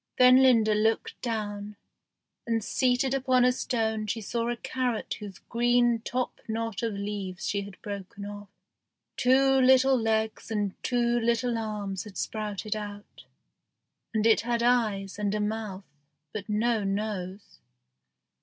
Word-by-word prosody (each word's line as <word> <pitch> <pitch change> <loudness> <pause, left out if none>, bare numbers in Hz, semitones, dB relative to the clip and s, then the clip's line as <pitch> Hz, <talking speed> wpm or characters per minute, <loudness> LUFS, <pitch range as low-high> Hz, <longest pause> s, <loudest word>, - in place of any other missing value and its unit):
Then 255 +1 +7
Linda 230 -5 +5
looked 220 +2 0
down, 210 -3 -4 0.7
and 225 -2 0
seated 255 +3 +1
upon 260 -2 +3
a 250 - +5
stone 220 -4 -1
she 220 +2 -2
saw 230 +2 -2
a 240 - -2
carrot 255 -2 -2
whose 205 -3 -8
green 240 0 +3
top 250 +2 -3
knot 225 -2 -3
of 230 -2 -1
leaves 200 -2 -4
she 200 - 0
had 200 -1 -10
broken 200 0 -6
off. 205 0 -8 0.7
Two 270 +1 +4
little 260 +1 +6
legs 220 -2 -1
and 205 -3 -1
two 240 -1 +1
little 235 +1 +1
arms 210 -4 -3
had 205 -2 -10
sprouted 215 0 -3
out, 205 -1 -8 0.9
and 220 -1 0
it 225 -1 +5
had 235 0 -1
eyes 210 -5 +1
and 205 0 0
a - - -1
mouth, 210 -2 -3 0.5
but 215 0 -6
no 220 +1 +1
nose. 195 -1 -4
220 Hz, 140 wpm, -28 LUFS, 205-240 Hz, 0.9 s, Then